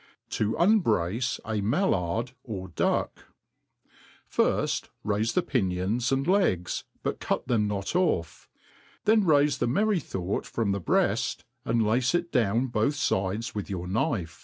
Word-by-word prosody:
To 105 +1 0
unbrace 120 - +2
a 110 -2 -1
Mallard 115 - 0
or 95 -6 -6
Duck. 85 - -1 1.0
FIRST, - - 0 0.2
raife 105 +2 +1
the 180 - +3
pinions 110 - 0
and 135 0 +1
legs, 175 - +1 0.2
but - - -2
Cut - - -2
them 110 -4 +2
not 100 - -3
off'; 130 - 0 0.6
then 215 0 +5
raife 145 -3 +3
the - - +1
merry 205 - +2
thought 95 - -3
from 110 -4 -1
the 100 0 -1
breaft, - - +1 0.2
and 115 -1 +2
lace 120 +7 +2
it 175 0 -1
down 115 -1 +2
both 115 +5 +1
fides 105 -4 -1
with 105 -1 -5
your 90 -3 -4
knife. 90 -3 -1
115 Hz, 140 wpm, -27 LUFS, 100-140 Hz, 1.0 s, then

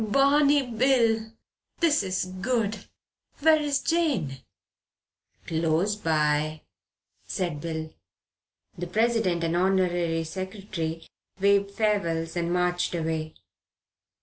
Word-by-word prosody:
"Barney 280 +4 +4
Bill! 230 -2 +2 0.5
This 320 -3 +3
is 190 -1 -1
good. 210 +2 -2 0.6
Where 315 0 +5
is 290 -2 0
Jane?" 275 - 0 1.1
"Close 165 +5 +1
by," 155 -4 0 0.7
said 170 -6 -3
Bill. 160 -1 -5 0.8
The 175 - -5
President 215 -4 +1
and 165 0 0
Honorary 175 -3 +1
Secretary 185 -2 -5 0.3
waved 200 0 +3
farewells 185 -6 -1
and 170 0 -1
marched 180 0 0
away. 160 -1 -3
185 Hz, 95 wpm, -26 LUFS, 165-225 Hz, 1.1 s, Where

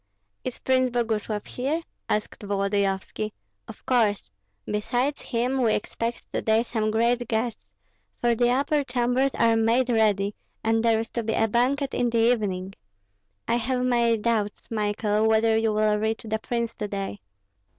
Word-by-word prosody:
"Is 255 - -4
Prince 255 -1 +2
Boguslav 220 -3 -1
here?" 290 +7 -2 0.3
asked 210 - -2
Volodyovski. 200 +1 -1 0.3
"Of - - -12
course. 210 - +1 0.3
Besides 245 +7 -1
him 250 +2 -1
we 225 -3 +3
expect 230 +3 -4
to - - 0
day 220 +1 +3
some 220 -2 -1
great 235 +2 +1
guests, 225 - -2 0.5
for 240 0 +3
the 240 +1 +2
upper 285 +3 +2
chambers 250 +1 +1
are 230 -1 +3
made 230 +3 +2
ready, 210 -3 +2 0.3
and 225 0 +2
there 225 -1 +3
is 225 - -4
to 235 - -2
be 225 0 -2
a 225 - +2
banquet 260 +5 +1
in 245 - +1
the 230 0 +3
evening. 195 -4 -3 0.7
I 235 - +2
have 250 +1 0
my 235 -2 +3
doubts, 215 -1 -2
Michael, 210 0 +1
whether 220 0 +3
you 225 0 +2
will 210 0 +2
reach 220 +1 -1
the 220 0 -1
prince 235 0 -2
to 210 - -3
day." 195 - -4
225 Hz, 160 wpm, -25 LUFS, 215-245 Hz, 0.7 s, we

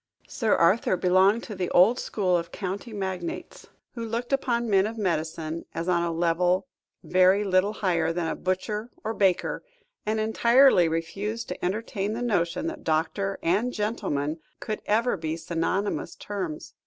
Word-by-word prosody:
Sir 225 -5 +1
Arthur 185 +2 +3
belonged 190 +5 +3
to 215 - -7
the 185 -2 -2
old 215 +8 +5
school 185 -4 0
of 170 -1 -2
county 195 +4 -5
magnates, 190 -4 -5 0.3
who 235 - -5
looked 235 +3 -3
upon 240 -3 +1
men 195 -1 +3
of 225 +1 -6
medicine 165 -4 -2
as 165 - -3
on 175 -1 +2
a 170 0 -1
level 175 +3 +1 0.4
very 185 +2 +4
little 190 +1 +2
higher 170 -6 0
than 170 0 -2
a - - -2
butcher 210 +5 -2
or 220 0 -2
baker, 190 -5 +1 0.4
and 215 +1 -1
entirely 235 -2 +5
refused 200 +8 -3
to 180 - -6
entertain 205 +1 -2
the 235 +2 -3
notion 195 - 0
that 330 - -5
doctor 165 +5 0
and 210 +9 +1
gentleman 180 -9 -2 0.2
could 215 - -4
ever 225 +1 +2
be 160 -1 -3
synonymous 170 +5 -2
terms. 185 -7 -5
190 Hz, 155 wpm, -26 LUFS, 170-220 Hz, 0.4 s, old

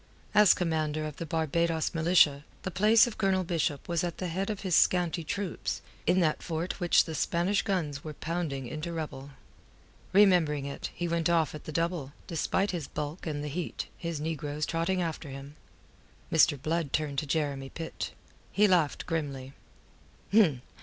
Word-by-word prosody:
As 210 -3 +7
commander 155 -3 -1
of 150 -2 -6
the 165 - -5
Barbados 160 +1 0
Militia, 160 -4 +4 0.2
the 185 - -3
place 215 +6 +5
of 240 - -7
Colonel 190 -2 +2
Bishop 160 -5 -1
was 170 -1 0
at 175 -1 -3
the 185 - -3
head 190 +5 -2
of 210 -2 -3
his 185 -4 +1
scanty 175 -2 +3
troops, 195 +2 -3 0.2
in 185 - +4
that 155 -3 +1
fort 170 +3 -3
which 175 -2 +4
the 160 - -6
Spanish 175 +6 +1
guns 155 -8 -2
were 155 -1 -7
pounding 155 -5 -3
into 155 +6 -5
rubble. 145 -4 -5 0.8
Remembering 175 -8 +4
it, 140 - -5
he 175 - -2
went 170 0 0
off 165 -2 +2
at 150 - -9
the - - -5
double, 165 -3 -2
despite 190 +4 0
his 170 -6 -4
bulk 150 +4 -5
and 145 -2 -3
the - - -3
heat, 165 +4 -4
his 170 -3 -4
negroes 150 -1 -3
trotting 170 +2 0
after 160 -3 -4
him. 140 +2 -9 0.8
Mr. 155 -3 +4
Blood 155 0 -1
turned 145 -3 0
to 150 - -5
Jeremy 140 -3 -1
Pitt. 165 +2 -5 0.4
He 210 +1 +4
laughed 175 -6 +2
grimly. 140 -5 -3
165 Hz, 165 wpm, -29 LUFS, 150-175 Hz, 0.8 s, As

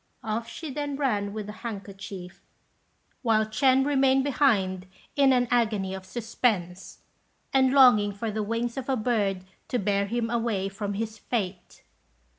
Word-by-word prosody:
Off 225 +1 -3
she 315 -4 -7
then 290 0 -3
ran 210 -8 0
with 210 0 -5
the 210 - -6
handkerchief, 195 -4 -7 0.8
while 220 -3 +3
Ch'ên 260 +5 +3
remained 270 -2 +3
behind 195 -10 +1 0.3
in 275 -2 +5
an 245 -1 +3
agony 215 -6 +1
of 190 -1 -8
suspense, 200 -6 -2 0.5
and 265 -1 +4
longing 245 -7 +6
for 215 +2 -4
the 215 +1 -2
wings 230 +3 -2
of 270 0 -4
a 265 - +2
bird 210 -5 0 0.2
to 250 - -1
bear 200 -2 0
him 230 +1 -2
away 225 -5 0
from 200 0 -4
his 220 +1 -4
fate. 195 -7 -4
220 Hz, 150 wpm, -27 LUFS, 200-255 Hz, 0.8 s, longing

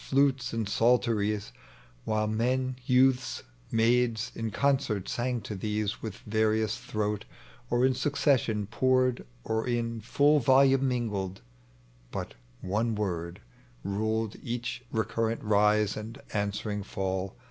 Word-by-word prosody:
Antes 135 -2 +3
and 115 -2 -2
psalteries, 110 -2 +1 0.5
While 110 0 +1
men, 125 +4 0
youths, 130 0 +3 0.3
maids, 115 0 +2
in 115 -1 -3
concert 125 -6 0
sang 120 0 -1
to 105 - -6
these 105 +1 -2
With 110 -4 -5
various 110 0 +1
throat, 105 0 -2 0.4
or 120 +1 +3
in 130 - +3
succession 130 -7 +1
poured. 130 +3 +2 0.2
Or 110 +1 -1
in 115 -2 -1
ftiU 145 +6 +3
volume 135 +1 +5
mingled. 105 -7 -2 0.7
But - - -5 0.3
one 110 +4 0
word 85 -4 -3 0.4
Ruled 110 +2 -1
each 120 +1 -4
recurrent 115 0 -1
rise 105 0 +3
and 110 +5 -7
answering 105 0 -2
fall. 95 -1 -3
115 Hz, 115 wpm, -29 LUFS, 105-125 Hz, 0.7 s, volume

